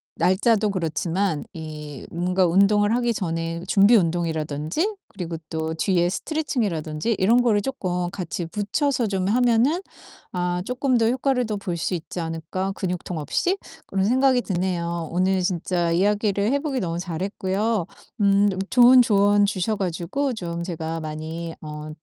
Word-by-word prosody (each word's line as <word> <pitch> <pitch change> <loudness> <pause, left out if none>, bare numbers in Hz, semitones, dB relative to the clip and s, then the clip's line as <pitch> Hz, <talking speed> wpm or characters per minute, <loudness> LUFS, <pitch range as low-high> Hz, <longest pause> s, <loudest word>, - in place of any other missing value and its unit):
날짜도 210 +5 +2
그렇지만 175 -1 -1
이 150 -3 -8
뭔가 180 +2 +1
운동을 205 +4 +4
하기 240 -1 +1
전에 165 -3 -3
준비 200 +4 +5
운동이라든지 165 - 0
그리고 175 -4 -5
또 160 0 -2
뒤에 175 +1 +1
스트레칭이라든지 210 - -2
이런 230 +6 +4
거를 220 -4 +3
쪼끔 180 -8 -2
같이 175 -2 -4
붙여서 225 - 0
좀 190 -2 -1
하면은 245 - +3 0.5
아 180 0 -1
쪼끔 255 0 +1
더 225 -1 +3
효과를 255 0 +1
더 210 -1 -2
볼 195 -3 -4
수 180 - -1
있지 170 +1 -6
않을까, 165 +4 -3
근육통 180 -3 -4
없이?' 350 - 0 0.3
그런 195 0 0
생각이 255 +2 +3
드네요. 170 -3 -2
오늘 185 +2 +1
진짜 175 -1 0
이야기를 205 +3 +1
해 280 - +2
보길 275 -5 -2
너무 170 -1 -2
잘했고요 190 +3 -2 0.3
음 200 0 +4 0.2
좋은 250 +1 +7
조언 205 -2 +4
주셔 200 +2 -1
가지고 195 +10 -2
좀 170 -5 -4
제가 165 -2 -4
많이 160 +2 -5
어 150 0 -7
190 Hz, 315 characters per minute, -23 LUFS, 170-220 Hz, 0.5 s, 좋은